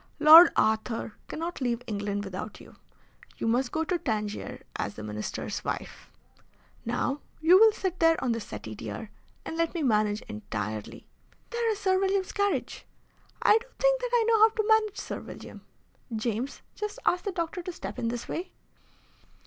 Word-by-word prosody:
Lord 315 +3 +10
Arthur 220 +1 0
cannot 335 0 -5
leave 245 -1 -1
England 205 -2 -3
without 195 +2 -6
you. - - -15 0.6
You - - -3
must 245 +2 +1
go 320 - 0
to 350 +1 -1
Tangier 210 -6 -3
as - - -3
the 105 - -8
Minister's 105 0 -4
wife. - - -5 0.7
Now, 245 +4 -1 0.2
you 345 +4 +6
will 445 0 +8
sit 375 -4 -3
there 330 0 +5
on 250 - +1
the 230 - -1
settee, - - -7
dear, - - -7 0.3
and 325 - -5
let 335 +1 0
me 330 - -1
manage 215 -4 +1
entirely. 105 0 -6 0.5
There 470 -1 0
is 425 - -2
Sir 375 -2 +2
William's 385 -1 0
carriage! 405 -1 -1 0.6
I 430 - +6
do 470 - -15
think - - +3
that - - -2
I 480 -2 +4
know 455 -1 +4
how 440 +1 +8
to 435 -1 -2
manage 440 -2 +3
Sir - - -5
William. - - -10 0.5
James, 230 +4 -3
just 420 +2 -5
ask 360 0 +2
the 400 - -2
doctor 340 0 -3
to 360 - -5
step 200 - -7
in 230 - -1
this 235 0 -4
way!" 360 +2 -4
320 Hz, 175 wpm, -28 LUFS, -, 0.7 s, Lord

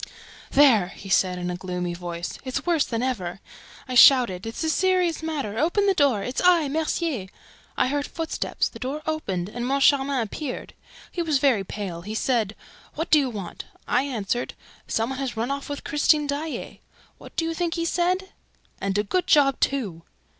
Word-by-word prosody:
"There!" 255 -10 +5
he 195 +1 -11
said, 185 -1 +2
in 180 0 -3
a - - -3
gloomy 180 -1 -3
voice. 175 0 -6
"It's 260 -1 -3
worse 335 -5 +2
than 230 0 -2
ever!... 195 -9 -2 0.5
I 255 - -4
shouted, 240 -7 +6
'It's 225 +7 -4
a 320 - +1
serious 365 -2 +2
matter! 280 -9 -3
Open 350 +6 +2
the 395 - +4
door! 275 - +2
It's 250 - -2
I, 350 -4 +5
Mercier.' 310 - -1 0.5
I - - +3
heard 285 +2 -1
footsteps. 325 -2 -2
The - - -11
door 285 +4 -4
opened 195 - -2
and 240 +3 -5
Moncharmin 275 +1 +3
appeared. 250 +4 -5 0.4
He 350 - -2
was 315 -4 +2
very 260 -7 +3
pale. 190 -3 -5
He 210 +5 -6
said, 220 -4 0 0.4
'What 320 - -3
do 310 - +7
you 270 -3 0
want?' 205 -6 -7 0.2
I - - +3
answered, 245 -3 -2 0.3
'Some 225 +3 0
one 265 - -4
has 260 -4 -3
run 235 +4 -1
away 280 0 -2
with 285 - -5
Christine 300 0 +3
Daae.' 290 +2 -4 0.4
What - - -13
do 330 - 0
you 330 - -1
think 340 0 -1
he 335 -1 -1
said? 365 +3 0 0.5
'And 195 0 -1
a 205 - +2
good 360 - -1
job, 275 -3 +4
too!' 210 -12 -1
265 Hz, 185 wpm, -24 LUFS, 205-310 Hz, 0.5 s, do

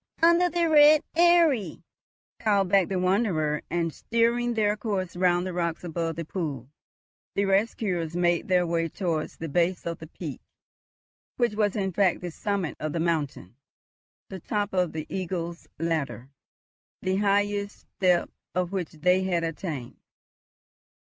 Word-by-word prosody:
Under 340 +1 +5
the 345 -1 +1
Red 300 -1 +7
Eyrie," 325 - +3 0.6
called 200 -3 +2
back 195 -2 +4
the 190 - -2
wanderer; 180 -6 +1
and 165 -2 -1
steering 235 +1 +1
their 210 -1 +2
course 200 -5 -3
round 175 0 +2
the 185 - -4
rocks 170 -1 -2
above 165 -1 -3
the 165 - -5
pool, 145 -8 -4 0.6
the 200 - +2
rescuers 195 -4 0
made 175 -1 +1
their 180 -1 +3
way 165 -1 0
towards 165 -4 -3
the 165 - -5
base 175 +4 0
of 170 -1 -4
the 160 - -9
peak, 155 -3 -7 1.0
which 240 -3 +1
was 210 -2 +1
in 190 -3 -1
fact 190 0 +2
the 175 -1 -5
summit 195 -3 -2
of 155 -1 -3
the 170 - -1
mountain, 145 - -2 0.7
the 190 - -7
top 205 +3 -2
of 180 -3 +1
the 155 -1 -5
Eagle's 170 -2 -4
Ladder, 150 -5 -2 0.7
the 185 0 +1
highest 205 0 0
step 180 -2 +2 0.2
of 180 -1 0
which 185 -4 -3
they 180 +4 +2
had 175 -3 0
attained. 155 -6 -5
180 Hz, 145 wpm, -26 LUFS, 165-205 Hz, 1.0 s, Red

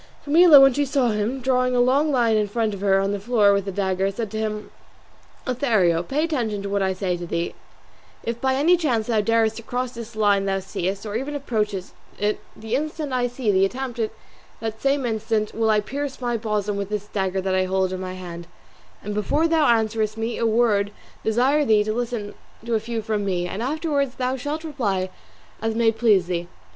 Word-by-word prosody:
Camilla 310 0 +8
when 270 -1 +7
she 290 - +1
saw 270 -3 +1
him, 220 +5 -1
drawing 255 0 +1
a - - +3
long 270 +5 +3
line 235 -4 +3
in 210 -1 +2
front 220 0 -1
of 195 - -7
her 195 -1 +3
on 195 +1 0
the 205 - -2
floor 210 -1 +3
with 200 -1 0
the 195 - -3
dagger, 190 0 0
said 205 +1 -4
to 220 - -3
him, 215 -1 -3 0.7
"Lothario, 220 -10 +2
pay 275 - -1
attention 235 -11 -1
to 200 - -4
what 200 0 0
I 190 0 +1
say 185 -1 -1
to 175 0 -6
thee: 170 0 -2 0.7
if 235 0 -4
by 265 0 +2
any 325 +6 +4
chance 250 -10 0
thou 220 -2 +1
darest 225 +1 +2
to - - -6
cross 245 +2 -3
this 235 -2 -9
line 205 -2 +3
thou 195 0 0
seest, 190 +1 -3
or 210 0 -5
even 275 +5 -3
approach 220 -7 -1
it, 205 +2 -4 0.2
the 220 +1 -6
instant 305 0 -3
I 245 -1 +1
see 245 -3 -1
thee 190 -1 +3
attempt 245 +4 -2
it 220 -1 0 0.5
that 220 -1 -5
same 275 -1 +1
instant 220 -1 -1
will 225 -1 +1
I 215 -1 +4
pierce 275 +4 -5
my 240 -2 -1
bosom 210 -2 -1
with 200 -1 -3
this 210 -1 -3
dagger 195 -2 -2
that 190 0 -1
I 185 0 +2
hold 190 0 0
in 185 - -4
my 185 0 -5
hand; 175 -2 -8 0.6
and 210 - -4
before 290 +10 +1
thou 320 -2 +3
answerest 220 -2 +1
me 225 +1 -3
a 230 - +2
word 220 -3 +2
I - - -20 0.3
desire 255 +7 +3
thee 215 -5 +4
to 215 +1 -2
listen 230 -3 -3 0.3
to 235 - -2
a 220 - +3
few 225 0 -4
from 210 -1 -1
me, 180 -3 -1
and 190 +4 -5
afterwards 280 0 -1
thou 255 0 -1
shalt 290 +5 -4
reply 205 - -2 0.5
as 225 0 -1
may 230 -1 +3
please 220 -5 +3
thee. 175 -1 -3
220 Hz, 220 wpm, -23 LUFS, 200-250 Hz, 0.7 s, Camilla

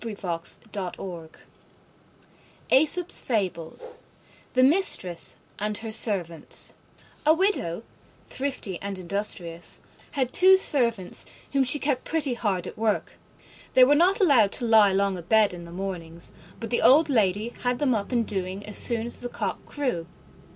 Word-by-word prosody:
Persuasion 195 -7 -4
is 170 - -3
better 180 -4 -7 1.3
than 270 +4 +6
force 290 - -3 0.6
THE 255 - +5
MISTRESS 260 - +1 0.2
AND 210 +1 -2
HER 225 -1 -6
SERVANTS 190 -7 -1 0.5
A 310 +1 +5
Widow, 320 - 0 0.4
thrifty 260 -9 -4
and 200 -1 -5
industrious, 175 -2 -2 0.3
had 260 -3 -1
two 380 +1 +7
servants, 235 - +3 0.3
whom 275 -1 +3
she 260 +3 +1
kept 280 -3 -1
pretty 300 -5 -2
hard 205 -6 -2
at - - -9
work. 220 -1 -1 0.6
They 255 - +8
were 270 +3 +6
not 355 +7 +3
allowed 265 - +4
to 245 - 0
lie 220 -3 +5
long 195 -1 0
abed 210 +3 +2
in 170 -1 -9
the 170 - -11
mornings, 170 -3 -6 0.3
but 230 -1 -6
the 240 - +1
old 300 +5 +6
lady 215 -4 +1
had 245 0 0
them 270 -2 +1
up 205 0 -3
and 235 -2 +1
doing 190 0 -4
as 210 - -2
soon 235 -2 +1
as 240 - -4
the 245 - -5
cock - - -4
crew. 250 - -3
220 Hz, 150 wpm, -25 LUFS, 185-265 Hz, 1.3 s, They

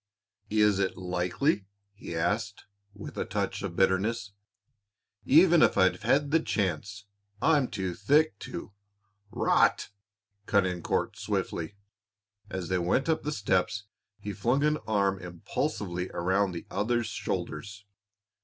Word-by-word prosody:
"Is 105 -2 +3
it 95 -1 0
likely?" 95 - 0 0.3
he 100 -4 -8
asked, 105 +5 -1 0.3
with 100 - -9
a - - +1
touch - - -2
of 85 - -5
bitterness. 100 +3 +1 0.9
"Even 165 +3 +6
if - - +4
I'd 95 -1 +3
had 145 0 +2
the 165 - +5
chance, 100 - -2 0.3
I'm 150 -5 +3
too 95 -4 -3
thick 145 - +2
to - - -7 0.3
" 100 +1 -40
"Rot!" - - +3 0.6
cut 100 -3 +3
in 90 -2 -2
Court, - - -1
swiftly. 85 +4 -3 0.7
As 95 -3 -4
they 95 +1 0
went 95 - +1
up 160 - +2
the 150 - -3
steps 100 -3 0 0.4
he 105 - -5
flung 120 +8 +1
an 150 0 +2
arm 100 -3 +1
impulsively 90 0 -3
around 95 +2 +1
the 85 - -6
other's 120 +4 0
shoulders. 100 -1 -4
100 Hz, 135 wpm, -28 LUFS, 95-115 Hz, 0.9 s, Even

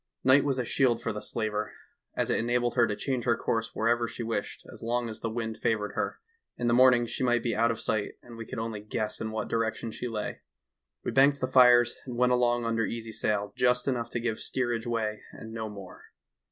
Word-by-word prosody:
Night 130 +2 +6
was 140 -2 0
a 125 - -1
shield 120 -1 +2
for 115 - -3
the 105 - -5
slaver, 105 -2 -3 0.4
as - - 0
it - - +2
enabled 120 +1 +1
her 120 -2 +4
to 105 - -2
change 125 +1 -2
her 120 -2 +3
course 115 0 -2
wherever 120 +1 +2
she 120 - -6
wished 115 -3 -4
as - - -13
long 120 +1 -1
as 110 -1 -7
the 115 - -3
wind 110 -1 -4
favored 105 -2 0
her; - - -2 0.4
in 120 - -2
the 120 - +3
morning 125 -1 +6
she 125 - -4
might 120 -2 +2
be 115 -3 0
out 115 +2 +3
of 115 -1 -2
sight, 105 -2 -1
and 120 -1 -12
we 115 - -6
could - - -6
only 110 -1 -3
guess 105 +1 -4
in 110 - -2
what 110 0 -3
direction 115 0 -1
she 125 - -5
lay. 110 -3 -4 0.3
" - - -59
We - - -2
banked 140 +1 +4
the 130 - 0
fires 125 -2 +6
and 120 -2 -5
went 125 0 +3
along 120 -1 +2
under 115 0 +1
easy 115 -1 -5
sail, 105 -1 -1
just 125 +1 +2
enough 120 -3 -1
to 120 - -3
give 115 -2 -2
steerage 120 -2 -1
way 110 -2 -1
and 110 - -9
no 110 -1 -4
more. 100 -3 -10
115 Hz, 235 wpm, -28 LUFS, 110-120 Hz, 0.4 s, Night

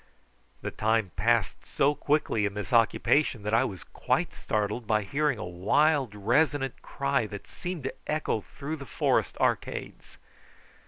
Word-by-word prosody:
The - - -3
time 110 -3 +1
passed 115 +2 +1
so 145 +2 +2
quickly 145 -7 +1
in 100 - -7
this 105 +2 -5
occupation 115 +1 +3
that 105 +1 -2
I 115 - +5
was 95 - -6
quite - - -1
startled 105 +2 -2
by 110 -1 +2
hearing 140 +4 0
a 110 - -5
wild 125 - +2
resonant 135 +5 +1
cry 140 -4 -1
that 100 -1 -8
seemed 180 -5 -6
to 135 - -3
echo 150 -7 0
through 145 +9 -6
the 140 -2 -9
forest - - +1
arcades. - - -2
120 Hz, 150 wpm, -28 LUFS, 105-145 Hz, -, I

